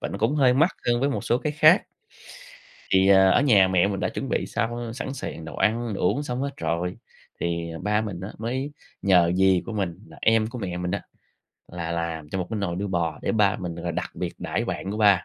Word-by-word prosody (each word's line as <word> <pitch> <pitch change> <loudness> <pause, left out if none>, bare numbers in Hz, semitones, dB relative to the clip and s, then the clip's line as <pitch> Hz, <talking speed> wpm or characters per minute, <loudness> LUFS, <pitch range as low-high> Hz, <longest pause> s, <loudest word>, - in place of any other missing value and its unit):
và - - -3
nó - - -5
cũng 115 +7 +1
hơi 130 -4 +4
mắc 160 +7 +4 0.2
hơn 120 0 +2
với 140 - +2
một - - -3
số 120 - +2
cái 150 +1 -2
khác. 155 +5 +6 1.1
Thì, 95 +1 +5
ờ, 95 -1 +6
ở - - +4
nhà 100 -9 +5
mẹ 95 0 +3
mình 95 -2 -3
đã - - 0
chuẩn - - -4
bị - - -1
xong 120 0 -3
sẵn 135 +1 -5
sàng 80 -10 -6
đồ 80 - -8
ăn, 115 0 +1
đồ - - -5
uống 110 +11 +2
xong 125 -2 -3
hết 140 - -1
rồi, 90 -2 -2 0.4
thì, 85 -1 -2
ờ, 80 - -7
ba 105 +1 +1
mình 100 -5 -5
á 95 +3 -6
mới 130 +6 -3 0.3
nhờ 90 -3 +4
dì 95 -1 +4
của - - -5
mình, 95 -6 -2
là 80 - -14
em 110 -1 +3
của 120 +3 -7
mẹ 90 -5 -4
mình 90 0 -3
á, 100 - -2 0.7
là 85 -1 -4
làm 85 -2 -3
cho 95 - -2
một 90 - -2
cái 110 - -2
nồi 90 -4 -2
đuôi 100 +1 -3
bò 85 -4 -1
để - - 0
ba 105 -2 +3
mình 90 -2 -5
là 85 0 -4
đặc - - -3
biệt - - -4
đãi - - -2
bạn 95 - -4
của 105 - -3
ba. 100 -4 +4
100 Hz, 250 wpm, -25 LUFS, 90-120 Hz, 1.1 s, khác